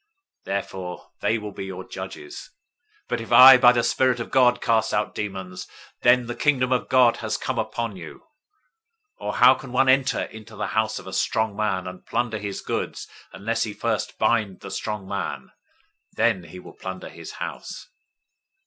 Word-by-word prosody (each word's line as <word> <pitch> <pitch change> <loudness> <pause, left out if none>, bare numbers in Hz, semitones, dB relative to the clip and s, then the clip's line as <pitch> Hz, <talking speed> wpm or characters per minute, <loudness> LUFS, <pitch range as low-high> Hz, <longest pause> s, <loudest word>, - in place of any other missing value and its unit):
Therefore 95 -2 -5
they 115 - +1
will 105 -1 -6
be 95 - -7
your 95 -1 -7
judges. 375 +5 -8 0.5
012:028 - - -54
But 115 - -1
if 115 - -9
I 130 +2 +10
by 125 -1 +7
the 120 -1 +1
Spirit 125 +1 +2
of 115 - -6
God 125 -2 +4
cast 115 -3 +1
out 105 0 -1
demons, 95 -3 -5 0.3
then 120 0 +4
the 120 - -4
Kingdom 130 -2 +1
of 125 - 0
God 125 -2 +5
has - - -2
come - - -3
upon 115 -4 -3
you. 90 -3 -10 1.0
012:029 - - -6
Or - - -1
how 125 +1 +7
can 130 0 -9
one 130 +1 +3
enter 135 0 +3
into 110 0 -11
the 105 - -3
house 110 0 0
of - - -9
the 95 - -8
strong 110 0 0
man, 100 -3 -1
and 90 0 -8
plunder 115 -2 -2
his 100 -1 -5
goods, - - -4 0.2
unless 110 +4 -2
he 105 -2 -2
first - - -2
bind 105 -5 +1
the - - -8
strong 105 -3 -4
man? 100 0 -4 0.6
Then 90 -2 +1
he 85 +2 -11
will 90 - -12
plunder 95 0 -7
his - - -10
house. - - -7
110 Hz, 185 wpm, -24 LUFS, 100-125 Hz, 1.0 s, I